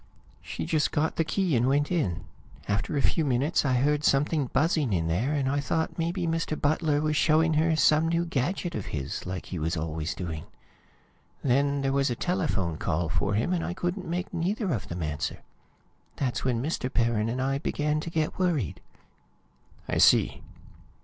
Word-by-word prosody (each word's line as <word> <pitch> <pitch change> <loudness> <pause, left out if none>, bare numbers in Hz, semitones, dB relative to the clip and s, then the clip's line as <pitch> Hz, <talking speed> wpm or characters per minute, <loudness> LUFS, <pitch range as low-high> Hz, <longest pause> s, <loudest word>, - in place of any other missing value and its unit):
She - - -5
just 155 -2 +1
got 155 +2 0
the 165 - +3
key 180 -1 0
and 120 +1 +2
went 145 +4 +2
in. 110 - 0 0.4
After 105 +8 -1
a 140 - +1
few 165 - +2
minutes 140 +3 +1
I 135 -3 +1
heard 145 +4 +2
something 145 0 +2
buzzing 145 - +1
in 85 -3 +1
there, 105 - 0
and 140 -3 0
I 140 +2 +1
thought 160 +3 -1
maybe 170 +2 -1
Mr. 165 -1 -1
Butler 150 0 +1
was 155 0 0
showing 160 +2 +3
her 160 +1 +3
some 155 +1 +4
new 170 +1 +1
gadget 170 +4 -1
of 105 - -4
his, 75 +5 -4
like 95 0 -4
he 90 - -5
was 80 +2 -1
always 80 +1 -3
doing. 80 -4 -5 1.0
Then 140 +2 +2
there 135 0 +1
was 140 -1 +2
a 120 - -1
telephone 135 - -1
call 85 -1 -1
for 100 +3 0
him, 115 - +1
and 175 - 0
I 175 - -3
couldn't 180 +1 -3
make 180 +4 -3
neither 185 +2 -1
of 110 - -3
them 85 0 -4
answer; 75 -1 -3 0.7
that's 130 -3 -2
when 125 -2 0
Mr. 140 -4 -2
Perrin 115 -3 +1
and 125 +3 -2
I 135 +1 0
began 150 +1 0
to 160 - -5
get 160 0 -2
worried." 160 - 0 1.1
"I - - 0
see." - - +5
145 Hz, 185 wpm, -27 LUFS, 115-165 Hz, 1.1 s, see